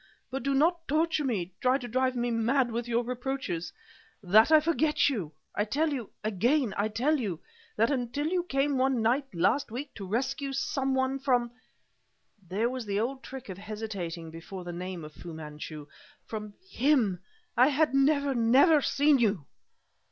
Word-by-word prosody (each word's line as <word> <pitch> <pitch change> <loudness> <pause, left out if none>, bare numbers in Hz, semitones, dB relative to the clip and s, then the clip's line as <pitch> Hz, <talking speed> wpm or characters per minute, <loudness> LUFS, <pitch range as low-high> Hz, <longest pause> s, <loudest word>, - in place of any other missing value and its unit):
But 270 - -3
do 275 +2 0
not 330 +4 +2
torture 315 +1 +1
me, 190 -9 -2
try 255 +1 +3
to 250 -3 -7
drive 255 +2 0
me 240 0 -1
mad 240 +2 +1
with 235 +1 -3
your 235 0 +1
reproaches 245 -9 -3 0.5
that 215 - +5
I 310 - +8
forget 305 -1 +2
you! 195 - -3 0.2
I 205 - +1
tell 295 +8 0
you 245 -6 -4
again 225 +4 +1
I 205 - +1
tell 260 +8 +1
you 190 -9 -3 0.4
that 225 +5 +2
until 260 +2 -1
you 355 +3 +1
came 275 -4 0
one 260 -3 +2
night, 255 +5 +2
last 180 +12 +1
week, 255 +6 -6
to 195 -3 -8
rescue 270 +6 -2
some 270 0 -1
one 265 +1 0
from 245 -3 +1 0.5
" 195 -5 -33
There 210 +5 +1
was 250 -2 -4
the 200 0 0
old 260 +4 -2
trick 265 -1 -9
of 190 -1 -7
hesitating 195 -6 -5
before 175 +3 -8
the 175 0 -6
name 180 -1 -5
of 150 - -11
Fu 170 +1 -9
Manchu 150 -1 -8 0.4
"from 210 -2 -6
him, 250 - +2 0.4
I 250 +2 +6
had 300 0 +2
never, 280 0 +3
never 265 +7 +5
seen 285 0 +3
you!" 200 - +1
245 Hz, 175 wpm, -29 LUFS, 205-275 Hz, 0.5 s, I